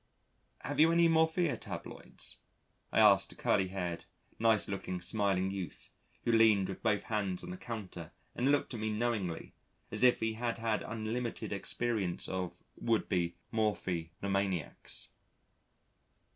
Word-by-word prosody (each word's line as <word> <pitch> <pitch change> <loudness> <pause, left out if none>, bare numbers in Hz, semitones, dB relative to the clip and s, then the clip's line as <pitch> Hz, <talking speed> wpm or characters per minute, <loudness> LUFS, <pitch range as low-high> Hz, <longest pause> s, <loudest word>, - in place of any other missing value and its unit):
"Have - - -3
you 160 +2 +7
any 170 0 +5
morphia 160 0 +3
tabloids?" - - -6 0.5
I - - +3
asked 100 -3 +6
a - - -11
curly 95 - +2
haired, 90 -3 -4 0.3
nice 115 -1 +3
looking, 95 -2 -3
smiling 95 0 +1
youth, 95 -4 -6 0.3
who 120 - +2
leaned 110 -4 +5
with 95 - -6
both 105 -3 +1
hands 100 -5 -1
on - - -6
the 185 - -6
counter 100 - -7 0.2
and 125 +3 +1
looked 145 -2 +1
at 115 - -4
me 110 0 -1
knowingly, 105 -6 -2 0.4
as - - -2
if 125 -1 +6
he 110 0 0
had 115 +1 -2
had 115 -1 0
unlimited 115 +2 -3
experience 110 -7 -1
of 95 -2 -4
would 115 -2 0
be 85 -3 0 0.2
morphi 95 -7 0
nomaniacs. 95 -4 -2
105 Hz, 145 wpm, -33 LUFS, 95-115 Hz, 0.5 s, you